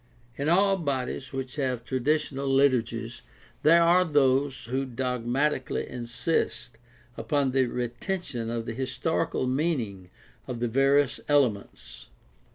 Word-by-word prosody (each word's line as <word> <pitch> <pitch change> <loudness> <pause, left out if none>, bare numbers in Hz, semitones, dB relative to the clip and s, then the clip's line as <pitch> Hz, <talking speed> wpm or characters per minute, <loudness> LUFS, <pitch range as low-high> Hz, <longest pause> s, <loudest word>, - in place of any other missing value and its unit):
In 140 +3 -1
all 195 +3 +4
bodies 130 -4 -3
which 135 +1 -5
have 130 -4 -1
traditional 140 +1 -1
liturgies 120 -4 +1 0.4
there 170 +3 +6
are 175 +2 +5
those 140 -3 +1
who 130 +3 -1
dogmati 125 +3 -1
cally - - -3
insist 120 -1 -2 0.4
upon 145 -3 0
the 130 -1 +2
retention 120 +1 -4
of 115 -1 -3
the 115 - -4
historical 135 +4 -1
meaning 125 - -2 0.4
of 120 -2 -5
the 120 - 0
various 135 +3 +2
elements. 105 - 0
130 Hz, 120 wpm, -27 LUFS, 120-145 Hz, 0.4 s, there